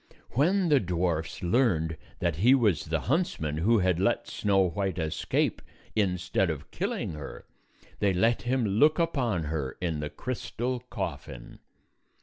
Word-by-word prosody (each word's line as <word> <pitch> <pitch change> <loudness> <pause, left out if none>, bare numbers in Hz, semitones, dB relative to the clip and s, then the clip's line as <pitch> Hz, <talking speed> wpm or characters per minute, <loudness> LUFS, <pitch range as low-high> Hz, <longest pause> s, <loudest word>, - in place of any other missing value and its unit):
When 175 - +2
the 145 -2 +5
dwarfs 85 -5 -2
learned 85 -6 +2 0.2
that 85 -4 -1
he 120 +9 +6
was 105 - +2
the 80 -2 -1
huntsman 120 - -1
who 110 +9 +3
had 90 -3 +2
let 100 +5 +1
Snow 95 -2 +2
White 95 0 -2
escape 80 -2 -1 0.3
instead 95 -2 +1
of 75 -3 -5
killing - - -2
her, 75 -2 -8 0.5
they 100 -1 +3
let 115 +6 +2
him 125 0 0
look 145 +10 +4
upon 130 - 0
her 75 -4 -3
in 85 -4 -2
the 75 0 -3
crystal 125 +3 -3
coffin. - - -6
95 Hz, 140 wpm, -28 LUFS, 80-120 Hz, 0.5 s, he